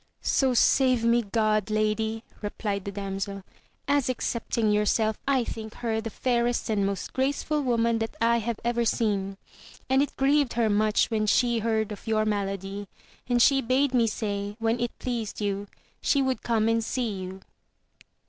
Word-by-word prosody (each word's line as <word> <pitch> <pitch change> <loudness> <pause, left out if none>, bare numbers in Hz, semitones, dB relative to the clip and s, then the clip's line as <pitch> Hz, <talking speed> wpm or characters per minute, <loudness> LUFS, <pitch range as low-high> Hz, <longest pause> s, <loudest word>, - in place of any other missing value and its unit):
So 265 -2 +2
save 255 -1 +4
me 235 +1 +4
God, 215 -1 0
lady, 215 +1 0 0.2
replied 205 -1 -3
the 200 - -3
damsel, 195 0 -4 0.4
as 285 -3 +2
excepting 230 -3 -1
yourself, 210 +1 +1
I 270 -3 +3
think 220 -1 -7
her 225 -2 -2
the 225 - -4
fairest 240 0 0
and 200 -2 +1
most 195 -2 -4
graceful 285 +3 0
woman 235 -3 +1
that 225 0 -3
I 235 +1 +3
have 230 0 -3
ever 235 0 +1
seen. 200 -4 0 0.5
And 265 +1 +5
it 290 - -2
grieved 280 -1 +2
her 225 -2 +2
much 215 +2 +2
when 215 -1 0
she 240 +1 +3
heard 220 -1 0
of 210 - -9
your 215 -1 +2
malady, 200 -1 -3 0.4
and 245 0 +3
she 270 +2 +5
bade 260 +2 +1
me 235 -2 +3
say, 205 -2 -3
when 225 +1 0
it 240 0 -3
pleased 235 -4 -4
you, 205 -1 -2 0.3
she 280 - +2
would 260 -1 -1
come 225 -2 +1
and 230 0 +2
see 240 0 -2
you. 190 -1 -6
225 Hz, 165 wpm, -26 LUFS, 210-240 Hz, 0.5 s, And